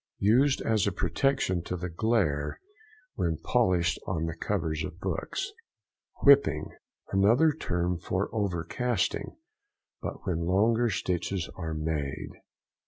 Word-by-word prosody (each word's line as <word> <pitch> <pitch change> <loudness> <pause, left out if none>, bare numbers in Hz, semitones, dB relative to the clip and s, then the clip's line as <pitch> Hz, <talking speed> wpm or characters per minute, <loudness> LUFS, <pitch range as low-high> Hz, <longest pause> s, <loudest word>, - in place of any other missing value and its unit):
—Used 130 +7 +3
as 110 -3 +2
a - - +2
protection 95 +2 0
to 90 - -3
the 90 +1 -4
glaire 85 -6 0 0.5
when 80 -1 -1
polished 85 0 +1
on 80 -3 -1
the 80 0 -3
covers 80 -4 -2
of 80 +3 -7
books. 95 - -3 0.7
WHIPPING.—Another 115 - +3
term 90 - -1
for 95 +3 -1
overcasting, 105 +4 -1 0.6
but - - -6
when 85 -3 -1
longer 115 +6 +3
stitches 90 -1 -2
are 80 -3 -4
made. 75 -3 -3
90 Hz, 110 wpm, -28 LUFS, 85-110 Hz, 0.7 s, Used